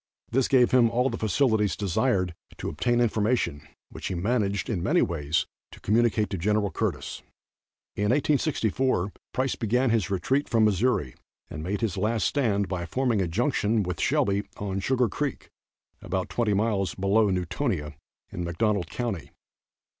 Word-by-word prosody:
This 130 +2 +2
gave 125 -3 +4
him 120 -3 +5
all 125 +3 +1
the 115 - -3
facilities 110 - +2
desired 95 -2 0 0.2
to - - -4
obtain 120 +10 0
information, 110 - +1 0.3
which - - -6
he 95 - -3
managed, 100 -1 0
in 100 -7 -2
many - - +3
ways, 80 -1 0 0.2
to - - -14
communicate 110 0 +2
to 95 - -2
Gen. 105 +5 +1 0.2
Curtis. - - -3 0.7
In 105 - -1
1864 130 - +1 0.2
Price 130 +1 0
began 125 +2 +1
his 110 -5 +1
retreat 130 +9 0
from 115 -2 +4
Missouri 105 - +1 0.4
and 75 - -5
made 95 +7 -3
his 110 -7 -1
last 110 0 0
stand 105 -8 +1
by 90 -2 -3
forming 125 0 +1
a 90 - 0
junction 110 - +1
with 90 -2 -4
Shelby 120 -9 +1
on 95 -1 -3
Sugar 125 +4 +1
creek, 140 +6 -4 0.5
about 95 0 -3
twenty 110 -4 +1
miles 100 -3 0
below 100 +2 +3
Newtonia, 80 -4 -2 0.4
in 90 - -4
McDonald 95 +2 0
county. 115 - -4
105 Hz, 155 wpm, -26 LUFS, 95-120 Hz, 0.7 s, him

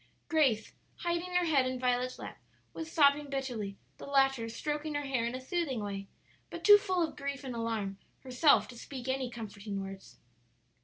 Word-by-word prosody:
Grace, 270 -9 +2 0.3
hiding 345 +1 -1
her 360 -1 +4
head 280 -6 +3
in 255 0 -2
Violet's 250 0 0
lap, - - -8 0.3
was 325 0 -6
sobbing 290 -1 +4
bitterly, 245 -8 -3 0.2
the - - -8
latter 270 -4 +3
stroking 295 +6 -3
her 290 - -1
hair 260 -4 0
in 240 - -3
a - - -4
soothing 275 -2 -2
way, 195 -1 -4 0.4
but - - -7
too 415 0 +9
full 370 -4 +1
of - - -12
grief 280 0 -4
and 260 -2 -5
alarm 220 -4 -2 0.2
herself 265 +3 +4
to 250 - -10
speak 255 +1 -8
any 260 -1 -1
comforting 205 -3 -6
words. 195 0 -8
260 Hz, 175 wpm, -32 LUFS, 230-295 Hz, 0.4 s, too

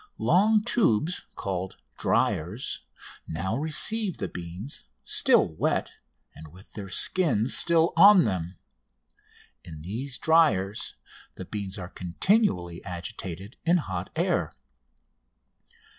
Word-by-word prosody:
Long 210 +4 +3
tubes, 180 - +1
called 95 -1 -4 0.2
"dryers," 95 - -1 0.5
now 95 +6 -3
receive 180 - +1
the - - -3
beans, 90 - -7 0.2
still - - +4
wet, - - -1 0.4
and 80 - -12
with 90 +6 -17
their 100 -2 -7
skins 130 - +1
still 165 -1 +3
on 195 +1 +8
them. 90 -3 -3 1.1
In 80 -3 -10
these 125 - -3
dryers 150 - +2 0.4
the 95 - -8
beans 100 -1 -5
are 90 -2 -6
continually 90 - 0
agitated 95 - -7
in 175 +1 +3
hot 95 - -4
air. - - 0
105 Hz, 105 wpm, -26 LUFS, -, 1.1 s, on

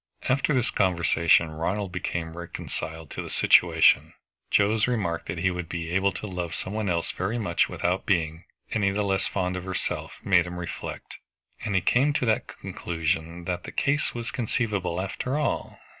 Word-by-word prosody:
After 135 +3 +2
this 125 -4 +2
conversation 85 -3 +3
Ronald 90 +5 -2
became 85 -2 -3
reconciled 80 -2 -6
to - - -4
the - - -7
situation. - - +5 0.3
Joe's 105 +2 +3
remark 100 -9 -1
that 85 - -3
he 95 +2 +2
would 90 -2 -5
be 85 -1 -4
able 95 +2 +3
to - - -6
love 90 -4 -4
some 95 - -5
one 110 -2 -1
else 85 -1 0
very 95 +6 -2
much 110 -4 +1
without 90 +2 -1
being 80 -3 0 0.3
any 105 -3 +2
the 105 +2 0
less 95 -1 +1
fond 90 0 -1
of 90 - -4
herself 95 0 -3
made 90 -2 +4
him 90 0 -6
reflect, 90 -1 -6 0.5
and 105 -3 -1
he 95 - +4
came 135 +10 +3
to 130 - 0
the 110 +1 +3
conclusion 85 -5 -3
that 90 0 -2
the - - -7
case 145 0 0
was 120 -1 -4
conceivable 105 -8 -1
after 110 +8 -2
all. 150 - -1
95 Hz, 175 wpm, -26 LUFS, 85-105 Hz, 0.5 s, situation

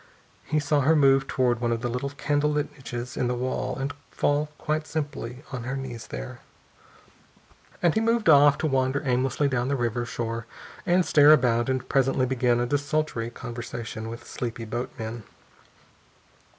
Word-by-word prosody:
He 155 +1 +1
saw 150 0 +1
her 155 +5 +4
move 135 -2 +4
toward 125 -2 +1
one 120 -1 +1
of 115 -1 -1
the 120 - -1
little 125 +3 -2
candle 145 +1 0
lit 150 0 -1
niches 125 -3 -6
in 125 - 0
the 125 - 0
wall 130 +1 -2
and 135 +1 -3 0.2
fall 145 +1 0
quite 155 0 -2
simply 145 -4 -4
on 125 -3 -4
her 135 +2 -3
knees 125 -4 -6
there. - - -7 1.4
And 170 - +4
he - - +2
moved 230 -1 +1
off, 145 -2 +7
to - - -2
wander 135 0 +1
aimlessly 130 +2 +1
down 125 -2 0
to 140 - +1
the - - -4
river 120 0 0
shore 115 0 -4 0.4
and 180 0 +4
stare 150 0 +7
about 120 -3 +2
and 130 -1 -1
presently 135 -1 +2
begin 125 -2 +1
a 120 - +1
desultory 145 -3 -1
conversation 120 -2 -6
with 115 +1 -8
sleepy 115 -1 -5
boatmen. 115 0 -5
130 Hz, 170 wpm, -26 LUFS, 120-145 Hz, 1.4 s, off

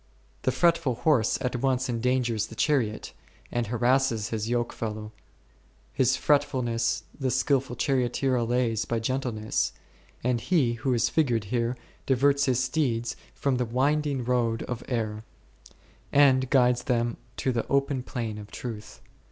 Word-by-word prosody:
The - - +1
fret 170 -1 +3
ful 130 -7 -1
horse 125 -5 +2
at 125 -1 -1
once 130 0 0
endangers 120 -2 0
the 110 - -11
chariot, 115 -6 0 0.4
and 120 -2 -1
harasses 120 -1 +1
his 110 -1 -3
yoke 120 -1 0
fellow; 110 -1 -5 0.8
his 130 0 +2
fretfulness 120 -5 +1 0.2
the 135 -2 0
skilful 130 0 +1
charioteer 130 +1 +1
allays 120 -2 +1
by 115 - -1
gentleness, 115 -2 -1 0.5
and 120 -1 +1
He 140 -9 +2
who 125 +2 -1
is 120 +1 +2
figured 125 -9 +1
here 120 +1 0 0.3
diverts 140 +2 +3
His 130 -1 +2
steeds 125 -4 -1 0.2
from 135 -2 0
the 125 - 0
winding 140 +2 0
road 120 -2 +1
of 125 -1 -5
error, 110 -3 -2 0.9
and 130 -2 +4
guides 125 -2 +3
them 120 -3 0 0.2
to 130 - 0
the 115 -2 -2
open 140 -1 +1
plain 115 -4 -4
of 105 0 -10
truth. 110 -4 -7
125 Hz, 145 wpm, -27 LUFS, 115-135 Hz, 0.9 s, and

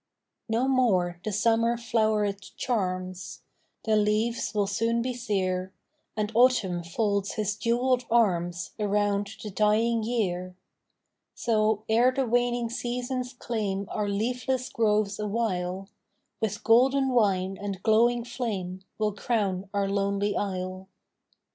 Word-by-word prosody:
No 235 +4 +1
more 190 -10 +2
the 215 - -2
summer 230 +3 +2
floweret 215 -4 0
charms, 185 -5 -3 0.4
The 220 - +2
leaves 215 +3 +1
will 205 -1 +1
soon 230 +4 0
be 255 0 -2
sere, 190 -6 -2 0.4
And 210 0 -1
Autumn 225 -7 +3
folds 200 +3 -1
his 210 -1 -1
jewelled 245 +3 +1
arms 175 -7 +1
Around 205 -1 +1
the 210 - -5
dying 220 +3 +2
year; 185 -6 -2 0.8
So, 215 -2 +1
ere 235 +3 +4
the 265 0 0
waning 240 0 +1
seasons 250 +1 -3
claim 205 -5 -3
Our 210 -1 -1
leafless 250 +5 -1
groves 210 -2 +1
awhile, 195 -3 -2 0.5
With 220 0 -2
golden 265 +4 +4
wine 195 -6 +1
and 195 -2 -5
glowing 235 +2 +3
flame 205 -7 -4 0.2
We 215 - 0
'll 210 - +1
crown 200 -3 -1
our 200 -1 0
lonely 200 +1 0
isle. 185 -1 -3
215 Hz, 125 wpm, -27 LUFS, 195-235 Hz, 0.8 s, ere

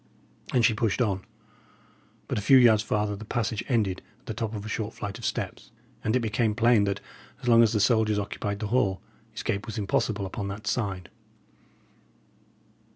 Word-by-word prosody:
And 120 -3 +4
she 115 - +4
pushed 110 0 0
on. 100 -6 0 1.0
But - - -1
a - - -4
few 130 +6 +6
yards 115 -4 +6
farther 105 -1 -1
the 105 - -8
passage 110 0 -2
ended 105 -7 +1 0.2
at - - -32
the 110 - -4
top 110 0 -3
of 105 0 -6
a - - -5
short 110 0 -3
flight 105 +2 -5
of 115 - -6
steps; - - -3 0.3
and 110 - +1
it 130 - +2
became 110 -1 0
plain 115 -3 +4
that, 100 0 -2 0.4
as - - -5
long 115 -1 +7
as 115 -2 +4
the 110 - +1
soldiers 110 0 +3
occupied 100 0 -3
the 105 - -1
hall, 100 -7 +2 0.4
escape 100 +3 -2
was 110 - -5
impossible 100 0 0
upon 100 +2 -4
that 100 +2 -6
side. 100 -5 -2
110 Hz, 185 wpm, -27 LUFS, 100-115 Hz, 1.0 s, long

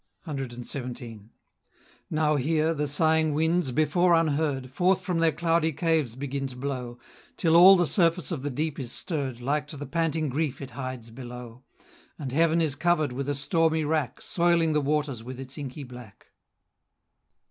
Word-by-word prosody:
CXVII. 125 - -6 0.8
Now 155 -1 +1
here, 155 +3 +1
the 150 -1 -2
sighing 155 +1 +2
winds, 160 -2 +1
before 170 +5 +3
unheard, 145 -5 0
Forth 180 +6 +2
from 180 -3 -1
their 165 -1 +4
cloudy 165 +1 +1
caves 155 -6 0
begin 135 0 -3
to 130 - -10
blow, 125 -2 -4 0.4
Till 165 -1 +3
all 185 +3 +9
the 175 -2 +3
surface 170 -2 +1
of 155 -6 -3
the 145 - -3
deep 150 +3 -3
is 125 -3 -5
stirr'd, 135 -7 -3
Like 145 +4 -1
to 150 - -8
the 145 - -6
panting 160 +1 0
grief 145 0 -2
it 135 -1 -8
hides 130 -4 -6
below; 125 0 -9 0.6
And 140 -5 -5
heaven 165 +3 +3
is 155 -4 0
cover'd 155 -2 +1
with 135 +3 -4
a 145 - 0
stormy 160 +2 +1
rack, 150 -3 -1
Soiling 170 -2 +2
the 150 - +2
waters 145 -4 -1
with 130 +1 -8
its 135 0 -7
inky 145 -1 -6
black. 125 -5 -13
150 Hz, 165 wpm, -27 LUFS, 130-160 Hz, 0.8 s, all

